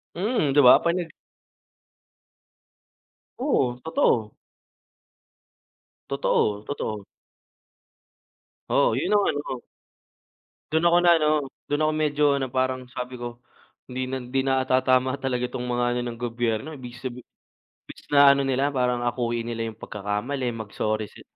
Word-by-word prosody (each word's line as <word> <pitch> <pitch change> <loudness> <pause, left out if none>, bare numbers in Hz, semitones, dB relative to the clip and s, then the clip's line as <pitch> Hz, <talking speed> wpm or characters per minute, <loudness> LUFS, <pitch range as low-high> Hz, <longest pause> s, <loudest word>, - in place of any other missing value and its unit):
Mm, 185 - 0
'di 145 - +6
ba 125 -2 +9
pag 170 - +2
nag 175 -2 -3 2.3
Oo, 125 -1 0
totoo. 115 -9 +1 1.8
Totoo, 110 -6 +1
totoo. 110 -7 -4 1.7
Oo, - - +3
yun - - -1
ang 205 -1 +4
ano. 145 -3 -4 1.1
Dun 160 +2 +3
ako 170 0 +5
na 175 - +6
ano, 155 - +2 0.4
dun 145 +1 0
ako 155 - +3
medyo 150 -1 0
ano 135 -1 -2
parang 130 0 -1
sabi 125 0 -5
ko, 120 0 -7 0.5
hindi 130 0 -3
na 130 - -3
hindi 130 +2 -1
na 130 -1 +2
ata 130 0 +3
tama 130 0 +2
talaga 125 -2 -1
'tong 125 0 -4
mga 120 0 0
ano - - 0
ng 120 -1 -6
gobyerno, 120 -1 -2
ibig 125 -2 -9
sabihi 125 -2 -6 0.6
imbis - - -13
na 140 -1 +7
ano 140 0 +4
nila 135 +2 +1
parang 125 -3 0
akuin 120 -1 -1
nila 115 -1 -3
yung 110 - -6
pagkakamali, 105 +7 -3
mag 110 -3 -7
sorry 110 0 -1
si - - -14
130 Hz, 140 wpm, -25 LUFS, 120-140 Hz, 2.3 s, ba